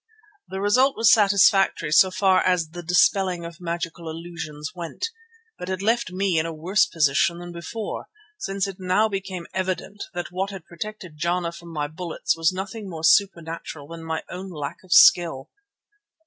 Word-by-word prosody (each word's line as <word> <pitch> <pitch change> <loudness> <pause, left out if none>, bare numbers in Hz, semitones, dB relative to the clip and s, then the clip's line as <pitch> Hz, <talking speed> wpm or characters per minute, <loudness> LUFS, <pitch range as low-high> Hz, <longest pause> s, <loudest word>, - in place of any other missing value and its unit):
The 190 - -5
result 255 +7 +3
was 225 -1 +6
satisfactory 195 -6 +4
so 185 +4 +6
far 185 0 +3
as 180 -4 +1
the 175 +2 -8
dispelling 180 +1 +2
of 170 +1 -10
magical 170 -1 -4
illusions 160 -2 -7
went, 175 - -5 0.5
but 180 - -6
it 185 -1 -2
left 230 -2 +1
me 185 -2 +1
in 160 - -1
a - - -4
worse 170 +6 +2
position 155 +2 +2
than 175 0 -8
before, 175 +6 -6 0.3
since 195 -1 -2
it 195 -2 -6
now 185 +4 +2
became 190 -4 -5
evident 190 +2 -3
that 175 0 -4
what 190 +2 -2
had 195 -4 -9
protected 180 -2 -8
Jana 170 +1 0
from 170 0 -12
my 150 -2 -2
bullets 160 +2 -2
was 165 +1 +2
nothing 195 +2 -6
more 160 -3 -7
supernatural 165 -5 +1
than 165 0 -8
my 160 0 -3
own 185 +2 -7
lack 150 -5 -5
of 185 - -18
skill. 165 -7 +5
180 Hz, 170 wpm, -24 LUFS, 165-195 Hz, 0.5 s, was